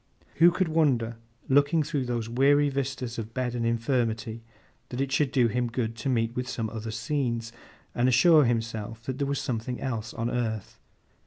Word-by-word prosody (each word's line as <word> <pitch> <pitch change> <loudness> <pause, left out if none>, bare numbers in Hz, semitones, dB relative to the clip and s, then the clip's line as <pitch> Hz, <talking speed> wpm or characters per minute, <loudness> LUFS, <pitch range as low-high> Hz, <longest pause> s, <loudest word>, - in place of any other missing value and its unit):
—' - - -31
Who 170 +1 +8
could 185 +1 0
wonder, 130 -8 +1 0.3
looking 145 +4 +3
through 145 -3 -2
those 120 -2 -2
weary 140 +4 +3
vistas 130 -3 -3
of 110 0 -7
bed 125 -1 -1
and 120 -1 -2
infirmity, 115 -1 -1 0.5
that 125 - -5
it 135 0 -1
should 135 0 +2
do 125 -4 +4
him 120 +2 0
good 115 -1 -2
to 115 +4 -2
meet 115 -2 0
with 125 0 -3
some 110 -2 -3
other 110 0 -5
scenes, 115 -2 -2 0.4
and 125 +1 +2
assure 150 +4 +6
himself 115 -1 -2
that 130 +3 -4
there 140 - 0
was 140 0 -1
something 120 +1 -3
else 115 -5 -3
on 115 +1 -2
earth? 110 -4 -3
125 Hz, 185 wpm, -27 LUFS, 115-135 Hz, 0.5 s, Who